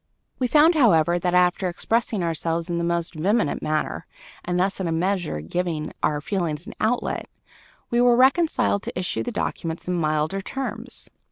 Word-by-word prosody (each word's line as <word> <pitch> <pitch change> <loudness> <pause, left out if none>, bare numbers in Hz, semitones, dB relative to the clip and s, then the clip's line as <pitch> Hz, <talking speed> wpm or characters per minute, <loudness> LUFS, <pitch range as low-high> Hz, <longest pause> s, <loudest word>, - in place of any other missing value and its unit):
We 255 - +1
found, 305 +6 +5
however, 175 - +4
that, 180 0 0
after 180 +1 +3
expressing 220 +2 -1
ourselves 165 +1 -2
in 170 - -1
the - - -1
most 170 0 -1
vehement 185 +2 0
manner 155 0 -2 0.4
and 180 0 -1
thus 195 +2 0
in 185 - -1
a - - -1
measure 175 - -1
giving 160 - -3
our 150 -1 +1
feelings 165 -2 -2
an - - -8
outlet, 230 +3 -1 0.6
we 240 0 +3
were 245 -1 +5
reconciled 265 - +3
to - - -6
issue 180 - -2
the 245 - -3
documents 165 -6 -3
in 180 - 0
milder 155 +2 0
terms. 245 +1 -6
180 Hz, 170 wpm, -24 LUFS, 165-225 Hz, 0.6 s, found